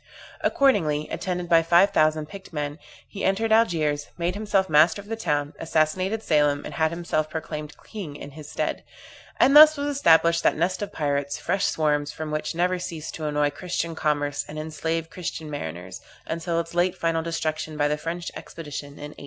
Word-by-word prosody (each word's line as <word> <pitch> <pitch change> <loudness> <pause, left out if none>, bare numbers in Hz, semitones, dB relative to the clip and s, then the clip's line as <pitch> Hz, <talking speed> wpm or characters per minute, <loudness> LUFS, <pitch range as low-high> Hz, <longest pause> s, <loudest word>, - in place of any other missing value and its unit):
Accordingly, 160 - +2
attended 180 -2 -3
by 165 -1 +5
five 170 +4 +4
thousand 155 0 +2
picked 195 +5 -11
men, 145 -1 -4 0.3
he 200 - -7
entered 220 +4 +1
Algiers, 155 -10 +2
made 175 +1 -1
himself 200 -2 +1
master 160 +3 +4
of 200 - -10
the 225 - -3
town, 145 -9 -1
assassinated 185 +7 0
Selim, 150 -4 +2
and - - -7
had 160 -1 +2
himself 160 -2 -2
proclaimed 155 -1 -6
king 190 -10 -7
in 140 0 -9
his 150 0 -11
stead; - - -2 0.6
and 275 +3 +5
thus 310 0 +10
was 285 0 -2
established 170 -8 +4
that - - +2
nest 180 +5 0
of 205 - -4
pirates, 140 -2 -1
fresh 195 0 0
swarms 150 -2 +1
from 155 0 -6
which 155 +1 -2
never 180 +1 +1
ceased 165 -3 -6
to 155 - -5
annoy 150 0 +1
Christian 170 +1 -3
commerce 145 -2 -1
and 150 - -8
enslave 160 +1 -3
Christian 160 -3 -5
mariners, 90 - -6 0.2
until 165 +1 -2
its 170 0 -5
late 175 +1 +1
final 165 -1 0
destruction, 155 -1 -3
by 145 -1 +2
the 150 - +1
French 170 +3 -5
expedition 145 -3 -7
in 145 +1 -9
1830. - - -16
160 Hz, 185 wpm, -25 LUFS, 150-180 Hz, 0.6 s, thus